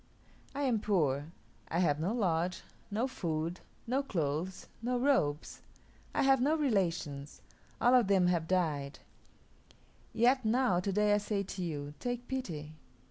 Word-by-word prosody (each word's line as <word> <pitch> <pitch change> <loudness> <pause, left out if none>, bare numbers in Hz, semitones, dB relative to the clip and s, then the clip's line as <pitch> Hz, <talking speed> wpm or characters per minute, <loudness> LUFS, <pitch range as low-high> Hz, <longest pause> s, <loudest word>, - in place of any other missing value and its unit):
I 285 - -1
am 245 -5 +2
poor. 155 -8 0 0.4
I 165 - -2
have 150 -5 +2
no 170 +6 0
lodge, 180 -6 0 0.3
no 220 +5 0
food, 165 -6 -3 0.3
no 255 +4 +1
clothes, 175 - -2 0.2
no 245 +2 0
robes. 240 - +1 0.5
I - - +3
have 270 -1 +4
no 295 +5 +3
relations. 175 - -1 0.4
All 245 - +4
of 245 -5 +5
them 190 -2 +4
have 170 -2 +1
died. 155 -6 0 1.1
Yet 250 +3 +3
now 230 -4 +2
to 195 +2 -1
day 210 +1 +3
I 205 - +4
say 205 -1 -1
to 190 -1 -5
you, 145 -4 -4
take 245 -1 -3
pity. 165 - -4
190 Hz, 145 wpm, -32 LUFS, 160-245 Hz, 1.1 s, of